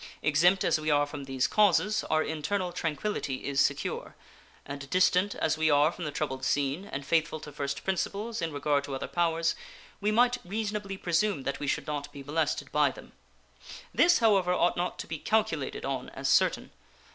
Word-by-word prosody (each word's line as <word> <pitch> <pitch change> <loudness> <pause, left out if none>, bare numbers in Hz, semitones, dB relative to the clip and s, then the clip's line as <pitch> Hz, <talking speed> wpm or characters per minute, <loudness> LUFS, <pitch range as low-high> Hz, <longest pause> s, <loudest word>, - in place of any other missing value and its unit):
Exempt 175 +6 +4
as - - +2
we 155 0 -2
are 145 -1 +3
from 145 -1 -7
these 135 -1 0
causes, 210 +1 +3
our 155 0 +1
internal 175 +4 -2
tranquillity 160 -4 -3
is 140 -1 +1
secure; - - -1 0.5
and 140 0 -7
distant 185 +2 +3
as 155 0 0
we 160 0 +3
are 145 +2 +4
from 175 -1 -7
the 150 - -3
troubled 135 -3 -3
scene, 140 +6 0
and 135 +1 -4
faithful 160 +1 +1
to 150 - -9
first 140 -1 -4
principles 200 +3 -2
in 165 -1 -2
regard 145 0 0
to 140 -1 -5
other 135 - -4
powers, 165 -1 +1 0.5
we 210 - 0
might 245 +2 +3
reasonably 205 0 -3
presume 175 -3 0
that 140 0 -3
we 145 - -4
should - - -1
not 145 -1 -4
be 140 -2 -9
molested 150 +2 -1
by - - +3
them. - - -12 0.8
This, 345 0 +5
however, 200 -6 +3
ought 175 0 +2
not 175 +1 -2
to - - -5
be 160 - -5
calculated 220 +4 -1
on - - -3
as - - -4
certain. - - +2
160 Hz, 185 wpm, -29 LUFS, 145-195 Hz, 0.8 s, This